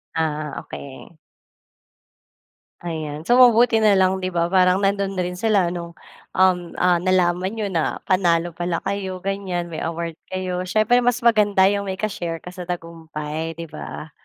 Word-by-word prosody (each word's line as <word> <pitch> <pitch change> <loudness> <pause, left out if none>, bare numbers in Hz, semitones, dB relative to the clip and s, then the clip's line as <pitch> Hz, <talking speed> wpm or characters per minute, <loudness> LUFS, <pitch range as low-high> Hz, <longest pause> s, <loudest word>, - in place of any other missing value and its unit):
Ah, 155 -2 -2
okey. 140 +4 -10 1.7
Ayan. 155 -3 -5
So, 245 - +6
mabuti 240 -2 +6
na 215 -2 +4
lang 190 0 +3
di 185 -1 -4
ba 170 0 +1
parang 185 0 +4
nandun 200 0 0
rin 180 -1 -3
sila 200 -3 +2
nung, 170 -1 -6 0.4
uhm, 180 -2 +2
ah, 180 -1 +4
nalaman 180 +1 +1
niyo 215 -3 -3
na 165 -4 -1
panalo 175 -3 +2
pala 175 -1 -2
kayo 190 -2 -4
ganyan, 190 -3 -3
may 160 - -6
award 165 0 -4 0.2
kayo. 185 -1 -2
Siyempre 215 +5 +3
mas 245 0 +1
maganda 205 -5 +4
yung 200 0 -1
may 190 - -3
ka-share 180 -5 -4
ka - - -9
sa 180 0 -8
tagumpay 165 -2 -5
di 165 0 -8
ba? 155 +1 -8
180 Hz, 155 wpm, -22 LUFS, 170-195 Hz, 1.7 s, So